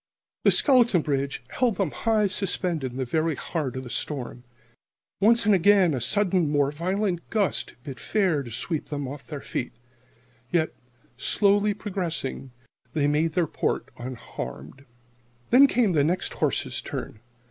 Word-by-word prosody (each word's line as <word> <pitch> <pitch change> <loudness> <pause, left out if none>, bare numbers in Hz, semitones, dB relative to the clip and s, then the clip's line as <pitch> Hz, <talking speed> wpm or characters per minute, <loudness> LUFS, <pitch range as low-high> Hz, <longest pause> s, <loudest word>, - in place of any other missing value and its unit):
The - - +8
skeleton 240 - +4
bridge 140 -2 -2
held 245 -4 +1
them 185 -5 -1
high 220 -2 +1
suspended 180 -7 -1
in 125 - -9
the 130 - -1
very 160 +4 0
heart 140 -3 -3
of 130 - -4
the 125 - -9
storm. 125 -4 -3 0.8
Once 225 +2 +4
and 210 - +5
again 190 -2 +5
a 130 - -2
sudden 185 - +2
more 145 -1 +2
violent 180 +3 -2
gust 210 -4 0
bid 135 -2 -8
fair 185 -9 +1
to 125 - -8
sweep 135 +7 -3
them 145 -3 -4
off 140 +1 -8
their 145 -3 -6
feet. 125 - -4 0.8
Yet, 160 0 +1 0.4
slowly 205 +7 +2
progressing, 175 -10 -4 0.4
they 150 -3 +1
made 150 +2 +1
their 175 0 +2
port - - -2
unharmed. 115 - -8 0.7
Then 270 +4 +8
came 240 -6 +2
the 145 -3 +3
next 175 +5 -1
horse's - - -1
turn. - - -6
165 Hz, 150 wpm, -25 LUFS, 140-200 Hz, 0.8 s, The